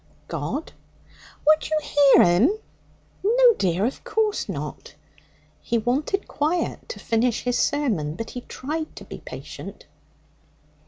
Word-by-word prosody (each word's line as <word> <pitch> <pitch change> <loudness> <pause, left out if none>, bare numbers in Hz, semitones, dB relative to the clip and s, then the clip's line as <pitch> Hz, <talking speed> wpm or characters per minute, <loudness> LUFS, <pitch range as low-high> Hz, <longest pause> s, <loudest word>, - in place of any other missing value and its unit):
'God.' 305 - -4 0.7
'Would 310 +1 +4
you 310 - +2
hear 285 -2 +6
'Im?' 215 - +4 0.7
'No, 480 +3 +6
dear; 185 +2 +1
of 255 - -3
course 435 -2 0
not.' - - -6 0.7
He 235 - 0
wanted 275 - 0
quiet 315 +9 -1
to 480 - -6
finish 230 +1 0
his 245 0 0
sermon, 210 - 0
but 225 +5 -6
he 250 - -6
tried 310 +6 -5
to - - -10
be - - -9
patient. - - -9
285 Hz, 125 wpm, -24 LUFS, 230-320 Hz, 0.7 s, hear